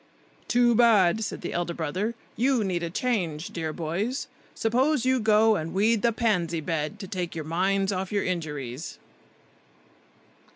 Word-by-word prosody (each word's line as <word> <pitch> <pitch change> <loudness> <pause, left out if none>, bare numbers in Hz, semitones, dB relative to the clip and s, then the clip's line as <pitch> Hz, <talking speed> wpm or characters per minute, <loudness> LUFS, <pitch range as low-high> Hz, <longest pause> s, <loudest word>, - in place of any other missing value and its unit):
"Too 240 0 +4
bad!" 220 -4 +4
said - - -5
the - - -4
elder 175 0 -2
brother. 185 +9 -2 0.2
"You 250 0 +2
need 180 -3 -1
a 170 - -2
change, 175 -7 -1
dear 160 -2 -3
boys; 180 - -2 0.3
suppose 255 +4 +1
you 260 0 +3
go 220 0 +4
and 165 -1 -4
weed 215 +2 +3
the 235 - +3
pansy 180 -8 0
bed, 160 +3 -3
to 190 - -6
take 180 -3 -4
your 160 -2 -4
minds 190 +4 +1
off 190 -1 -3
your 205 -1 0
injuries." 150 -6 -4
190 Hz, 155 wpm, -26 LUFS, 165-225 Hz, 0.3 s, Too